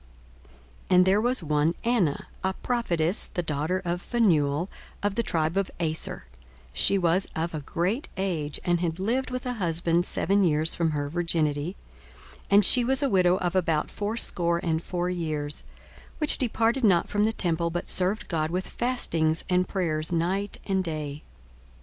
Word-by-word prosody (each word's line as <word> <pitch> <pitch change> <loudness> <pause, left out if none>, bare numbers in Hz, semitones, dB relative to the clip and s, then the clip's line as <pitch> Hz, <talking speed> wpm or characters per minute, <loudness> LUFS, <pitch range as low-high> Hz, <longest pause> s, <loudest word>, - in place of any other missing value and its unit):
42:002:036 - - +4
And 180 0 +6
there 195 +3 +3
was 245 -4 0
one 150 +2 +1
Anna, 220 -12 0 0.2
a 190 0 0
prophetess, 185 -8 0
the 175 - -1
daughter 160 +5 -1
of 175 +1 -2
Phanuel, 170 -9 +1 0.4
of 205 -1 +1
the 235 - 0
tribe 160 -5 -1
of 195 -1 0
Aser: 160 - -2 0.5
she 195 - +4
was 180 +1 +1
of 165 +1 -2
a 155 - -3
great 180 - -2
age, 165 -6 -2
and 175 -1 +2
had 170 0 -2
lived 245 +7 -1
with 255 0 -5
an 250 -1 -3
husband 170 -1 0
seven 200 +1 +1
years 155 -1 +2
from 165 -1 0
her 145 -2 -2
virginity; 160 0 -1 0.6
42:002:037 - - -19
And 200 0 +6
she 250 +4 +7
was 265 +4 +2
a 275 - +2
widow 180 -1 +4
of 180 -1 -2
about 165 -4 0
fourscore 205 -5 -1
and 160 -1 0
four 180 +1 -2
years, 155 -4 -4 0.5
which 300 -2 +5
departed 235 +1 +1
not 185 -6 +4
from 205 0 0
the 220 - +2
temple, 170 -5 0
but 175 +1 -4
served 190 +4 0
God 155 -2 -1
with 180 +2 -3
fastings 165 -10 0
and 180 0 +2
prayers 160 -5 -1
night 185 +4 -1
and 190 -1 0
day. 150 -3 -5
175 Hz, 170 wpm, -26 LUFS, 160-200 Hz, 0.6 s, she